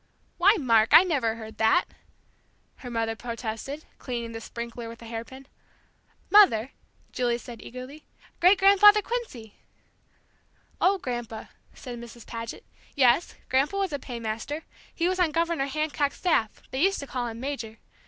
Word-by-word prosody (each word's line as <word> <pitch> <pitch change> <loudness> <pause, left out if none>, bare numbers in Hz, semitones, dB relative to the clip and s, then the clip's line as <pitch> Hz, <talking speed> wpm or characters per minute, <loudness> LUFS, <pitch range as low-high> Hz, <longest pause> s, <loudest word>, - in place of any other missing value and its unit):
"Why, 400 +5 +6
Mark, 230 - +4
I 345 - +10
never 265 -11 0
heard 220 -1 -10
that!" 220 +11 +4 0.9
her 250 - -9
mother 225 -1 -1
protested, 235 +5 -6
cleaning 235 -3 -4
the 225 0 -7
sprinkler 235 0 -7
with 230 - -10
a - - -10
hairpin. 235 +4 -8 0.9
"Mother!" 285 - +6 0.4
Julie 240 -2 0
said 240 -1 -10
eagerly. 255 +5 -10 0.3
"Great 365 +3 +6
grandfather 405 +2 +7
Quincy!" 320 - -5 1.3
"Oh, 390 +2 +4
Grandpa," 240 - -5 0.3
said 245 -2 -8
Mrs. 235 0 -11
Paget. 230 0 -7 0.3
"Yes, 265 +4 +3
Grandpa 275 +9 +1
was 390 -5 -1
a 285 - -2
paymaster. 235 +5 -5 0.3
He 340 - -1
was 370 0 -1
on 355 -3 +3
Governor 330 -3 0
Hancock's 295 0 -1
staff. 230 - 0
They 265 - -2
used 390 +3 +2
to - - -6
call 245 -2 -3
him 230 0 -7
'Major.' 235 -5 -5
255 Hz, 145 wpm, -26 LUFS, 230-330 Hz, 1.3 s, I